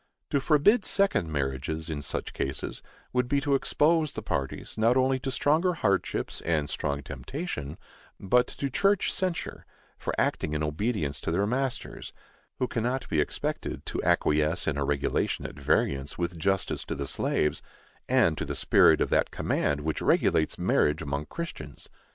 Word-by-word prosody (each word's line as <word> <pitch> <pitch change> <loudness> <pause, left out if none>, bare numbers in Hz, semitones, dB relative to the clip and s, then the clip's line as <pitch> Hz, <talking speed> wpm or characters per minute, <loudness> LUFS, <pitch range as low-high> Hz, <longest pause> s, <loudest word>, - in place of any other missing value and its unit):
To 140 - +3
forbid 170 - +4
second 195 - +2
marriages, 70 +2 -2
in 75 -3 -3
such 70 - -3
cases, 70 - -3 0.3
would 125 -1 +1
be 140 +2 +2
to 140 0 +1
expose 155 +3 +2
the - - -5
parties, 70 - -3
not 115 +3 +3
only 130 0 +2
to 135 +1 -3
stronger 155 +7 +2
hardships 100 - 0
and 80 -3 0
strong 70 0 -2
temptation, 75 - -5 0.4
but 125 +6 +3
to 140 -1 -4
church 200 +6 +2
censure, 185 -3 -2 0.4
for - - -2
acting 75 - 0
in 75 - -1
obedience 75 - -1
to - - -4
their 95 +5 +1
masters, 130 +3 -3 0.4
who 125 - 0
cannot 120 +3 -2
be 75 - +2
expected - - -3
to - - -3
acquiesce 75 +3 +2
in 80 - 0
a 70 - 0
regulation 70 0 0
at - - -5
variance 70 0 0
with 85 0 -2
justice 95 +3 0
to - - -3
the 70 - -3
slaves, 75 +2 0 0.5
and - - +3
to - - -2
the - - -4
spirit - - +5
of - - 0
that - - +3
command 75 0 0
which 80 +1 -2
regulates 80 - +2
marriage 75 +2 +2
among 70 +2 -3
Christians. 75 - -7
90 Hz, 165 wpm, -28 LUFS, -, 0.5 s, spirit